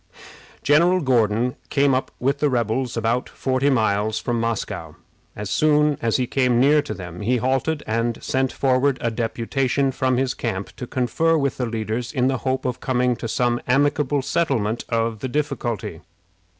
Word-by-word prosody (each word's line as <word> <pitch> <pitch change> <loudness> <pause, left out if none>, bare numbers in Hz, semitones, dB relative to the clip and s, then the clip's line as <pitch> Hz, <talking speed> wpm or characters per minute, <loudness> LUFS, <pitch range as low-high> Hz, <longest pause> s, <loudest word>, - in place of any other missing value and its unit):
General 170 +6 +4
Gordon 120 -2 +1
came 140 -1 +3
up 130 - 0
with 140 +3 0
the 150 - +2
rebels 120 0 -1
about 115 +2 0
forty 130 +1 0
miles 110 -3 +1
from 120 0 -1
Moscow. 115 -1 -3 0.4
As 105 0 -5
soon 150 +2 +3
as 115 -1 +1
he 130 - 0
came 125 -1 +2
near 145 +4 +5
to 145 - -6
them 90 -1 -8
he 125 +5 +1
halted, 135 +5 0
and 115 +1 -1
sent 130 0 0
forward 130 0 +2
a 115 - -1
deputation 125 +4 0
from 130 -1 0
his 130 0 0
camp 100 -5 -4
to 125 - -6
confer 160 +7 +1
with 140 -3 -1
the 125 - -1
leaders, 115 +1 -3
in 130 -1 +1
the 135 -2 -1
hope 130 +1 -2
of 125 -2 -2
coming 125 -1 +1
to - - -5
some 120 +1 0
amicable 145 +1 +2
settlement 125 -9 0
of 115 -1 0
the 130 - -3
difficulty. 120 - -3
125 Hz, 170 wpm, -22 LUFS, 115-140 Hz, 0.4 s, near